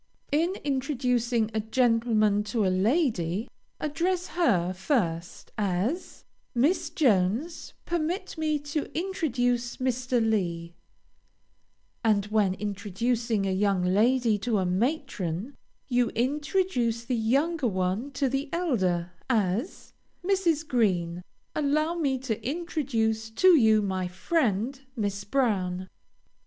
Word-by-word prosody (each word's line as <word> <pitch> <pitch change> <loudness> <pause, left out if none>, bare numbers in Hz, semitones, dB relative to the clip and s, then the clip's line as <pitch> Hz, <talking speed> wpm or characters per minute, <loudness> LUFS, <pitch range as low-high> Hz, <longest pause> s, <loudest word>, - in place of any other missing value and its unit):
In 335 +6 +1
introducing 250 -5 0
a 220 - 0
gentleman 220 -2 +2
to 215 -1 0
a 185 - +2
lady, 215 - +1 0.3
address 350 +4 -1
her 185 - +2
first, 180 - -2
as 210 - -2 0.3
"Miss 285 +10 +2
Jones, 235 - +1
permit 345 +3 -2
me 310 -2 0
to 290 +1 -4
introduce 245 -10 -1
Mr. 255 -1 0
Lee;" 170 -6 -1 1.3
and, 210 -3 +3
when 205 -4 +2
introducing 210 +2 -1
a 195 - 0
young 195 -1 +1
lady 220 +4 +3
to 225 0 0
a 190 - +1
matron, 210 - -2 0.3
you 245 -2 +2
introduce 255 - 0
the 255 - -2
younger 275 +6 +1
one 190 +5 -1
to 275 0 +1
the 270 +3 -2
elder, 190 - 0 0.2
as 220 - -1 0.3
"Mrs. 345 -5 +1
Green, 180 - +1 0.3
allow 305 +2 +1
me 285 -6 0
to 235 -4 -4
introduce 245 -8 -1
to 370 +12 +4
you 220 - +6
my 190 -2 -1
friend, 230 - 0
Miss 200 -3 -2
Brown." 195 -6 0
235 Hz, 110 wpm, -27 LUFS, 200-285 Hz, 1.3 s, you